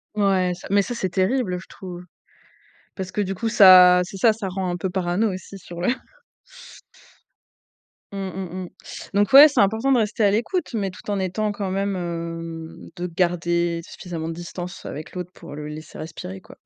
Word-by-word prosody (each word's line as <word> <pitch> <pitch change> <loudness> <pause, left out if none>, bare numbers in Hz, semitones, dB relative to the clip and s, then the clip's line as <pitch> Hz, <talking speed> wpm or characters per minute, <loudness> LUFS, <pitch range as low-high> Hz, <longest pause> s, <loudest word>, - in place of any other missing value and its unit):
Ouais, 190 -3 +2
ça - - -10
mais 200 0 +5
ça 240 +4 -4
c'est 190 -5 -2
terrible, 190 +1 0
je - - -14
trouve, 180 -1 -9 0.9
parce 185 -1 -5
que 210 - -1
du 195 -1 -2
coup, 225 +4 -2
ça 185 -4 +8
c'est 195 +2 -8
ça, 220 +2 +4
ça 210 -3 -5
rend 190 0 -3
un 175 - -3
peu 190 - -2
parano 185 +4 0
aussi 190 +1 -8
sur 175 -1 -10
le 180 - +1 2.2
Mmh 200 - -7
mmh 185 0 -5
mh, - - -11 0.5
donc 205 +3 +2
ouais, 285 +3 +12
c'est 280 -5 -1
important 220 +7 +2
de 260 - +5
rester 220 -1 0
à 200 - +6
l'écoute 270 - -1
mais 200 -3 -1
tout 180 - -11
en 200 - 0
étant 190 +3 -1
quand 200 -2 -4
même, 195 0 -1
hem, 165 -2 -6
de 180 +1 -4
garder 170 -1 0
suffisamment 165 -3 -6
de - - -3
distance 175 +1 -7
avec 155 - -7
l'autre 180 0 -5
pour 145 - -11
le 150 0 -6
laisser 155 +1 -9
respirer, 155 - -7
quoi. - - -16
185 Hz, 190 wpm, -23 LUFS, 175-205 Hz, 2.2 s, ouais